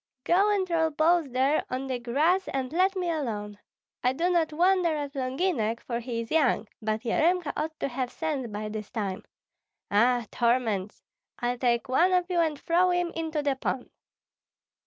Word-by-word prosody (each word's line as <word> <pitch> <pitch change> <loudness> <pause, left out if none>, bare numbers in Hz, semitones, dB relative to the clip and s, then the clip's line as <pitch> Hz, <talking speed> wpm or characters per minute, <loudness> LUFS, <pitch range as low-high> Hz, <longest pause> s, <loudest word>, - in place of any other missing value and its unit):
Go 390 +4 +3
and 390 -2 +1
roll 325 -2 +2
balls 315 0 +2
there 265 +4 +2
on 255 +1 -3
the 260 -2 -3
grass 310 +11 +1
and 265 +1 -3
let 375 +3 +2
me 365 -2 -2
alone! 210 -9 -4 0.4
I 250 +1 +3
do 340 +6 0
not 330 -3 +2
wonder 350 0 +3
at 285 -1 -4
Longinek, 255 - -1
for 235 -1 -4
he 235 -1 -3
is 230 - -9
young; 285 -8 +2
but 215 0 -1
Yaremka 325 +6 +1
ought 315 0 -3
to - - +1
have 255 -1 -3
sense 295 -6 -3
by 210 0 -5
this 215 -1 -6
time. 200 -4 -3 0.7
Ah, 240 +3 +3
torments! 230 -5 0 0.3
I'll 245 0 -2
take 240 +1 +1
one 340 +9 +3
of 360 0 +1
you 350 - +1
and 315 -3 +1
throw 355 +2 +2
him 355 -1 0
into 320 -2 -3
the 280 -2 +1
pond." 260 -1 -3
275 Hz, 180 wpm, -27 LUFS, 240-335 Hz, 0.7 s, Go